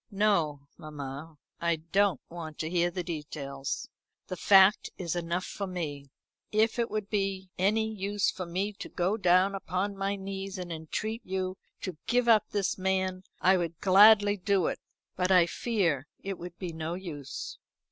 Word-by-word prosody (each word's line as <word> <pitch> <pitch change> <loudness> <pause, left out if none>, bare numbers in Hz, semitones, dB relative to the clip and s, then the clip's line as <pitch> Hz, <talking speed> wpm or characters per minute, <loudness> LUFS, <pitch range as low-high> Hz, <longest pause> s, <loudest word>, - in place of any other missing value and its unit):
"No, 180 -9 +1
mamma. 150 +1 -7 0.2
I 170 0 +2
don't 170 +1 +1
want 165 -3 -8
to 160 - -3
hear 175 -1 +2
the 180 +1 -4
details. 145 -4 -5 0.4
The 185 - -5
fact 195 +2 +6
is 175 -2 -3
enough 175 +1 -2
for 200 - -4
me. 150 -6 -5 0.4
If 220 +2 +2
it 235 - +1
would 215 -2 -3
be 195 -3 -2
any 215 +4 +2
use 205 0 0
for 185 -2 -6
me 190 +5 -2
to - - -6
go 185 +3 0
down 185 -1 +4
upon 195 +1 -2
my 195 +1 -1
knees 195 0 -5
and 180 -2 -5
entreat 215 +8 -4
you 185 -1 -2 0.3
to 185 -5 -5
give 245 0 +2
up 220 -2 +5
this 200 -2 -1
man, 185 0 0 0.2
I 190 +1 +5
would 170 -2 -3
gladly 205 +1 +7
do 190 -2 +1
it; - - -1 0.4
but 185 +1 +1
I 180 -2 +7
fear 170 - 0
it 195 -1 -5
would 175 0 -8
be 180 -3 -5
no 160 +1 -3
use." 160 -7 -7
185 Hz, 165 wpm, -29 LUFS, 170-200 Hz, 0.4 s, gladly